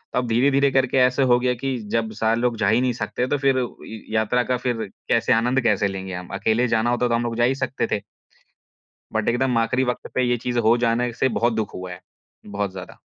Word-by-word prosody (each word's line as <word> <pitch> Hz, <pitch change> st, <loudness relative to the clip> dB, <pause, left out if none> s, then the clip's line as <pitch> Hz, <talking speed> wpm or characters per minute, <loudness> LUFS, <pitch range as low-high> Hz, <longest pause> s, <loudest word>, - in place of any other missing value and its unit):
अब 125 Hz, -1 st, 0 dB
धीरे-धीरे 135 Hz, +4 st, +3 dB
करके 130 Hz, 0 st, +1 dB
ऐसे 125 Hz, +1 st, +3 dB
हो 120 Hz, -1 st, +4 dB
गया 125 Hz, 0 st, +1 dB
कि 130 Hz, +1 st, -3 dB
जब 110 Hz, -1 st, 0 dB
सारे 110 Hz, +2 st, 0 dB
लोग 120 Hz, -2 st, 0 dB
जा 100 Hz, -2 st, +1 dB
ही 115 Hz, +3 st, +3 dB
नहीं 125 Hz, -1 st, +1 dB
सकते, 125 Hz, +1 st, -3 dB
तो 145 Hz, -, 0 dB
फिर 135 Hz, -1 st, +2 dB, 0.3 s
य 110 Hz, -1 st, -9 dB
यात्रा 110 Hz, +3 st, +2 dB
का 125 Hz, 0 st, -1 dB
फिर 120 Hz, -2 st, -2 dB, 0.3 s
कैसे -, -, +3 dB
आनंद 125 Hz, +4 st, +2 dB
कैसे 105 Hz, -3 st, +2 dB
लेंगे 95 Hz, -1 st, -6 dB
हम? 90 Hz, 0 st, -6 dB
अकेले 110 Hz, +5 st, +1 dB
जाना 115 Hz, +1 st, +1 dB
होता 120 Hz, 0 st, +1 dB
तो 115 Hz, -, +1 dB
हम 120 Hz, -, 0 dB
लोग 115 Hz, -1 st, -3 dB
जा 120 Hz, -, +2 dB
ही 130 Hz, +2 st, +2 dB
सकते 130 Hz, -3 st, -2 dB
थे। 100 Hz, -, 0 dB, 1.1 s
बट -, -, 0 dB
एकदम 125 Hz, 0 st, +1 dB
आख़िरी 125 Hz, +3 st, +1 dB
वक़्त 125 Hz, -1 st, -3 dB
पे 130 Hz, -, +2 dB
ये 120 Hz, 0 st, +1 dB
चीज़ 120 Hz, +1 st, -2 dB
हो 120 Hz, +1 st, +5 dB
जाना 115 Hz, +1 st, +2 dB
इससे 125 Hz, +2 st, 0 dB
बहुत 120 Hz, 0 st, +2 dB
दुःख 110 Hz, -1 st, -3 dB
हुआ 90 Hz, 0 st, -7 dB
है, 90 Hz, -, -9 dB, 0.4 s
बहुत 100 Hz, -1 st, -3 dB
ज़्यादा। 95 Hz, -1 st, -10 dB
120 Hz, 235 wpm, -22 LUFS, 110-125 Hz, 1.1 s, हो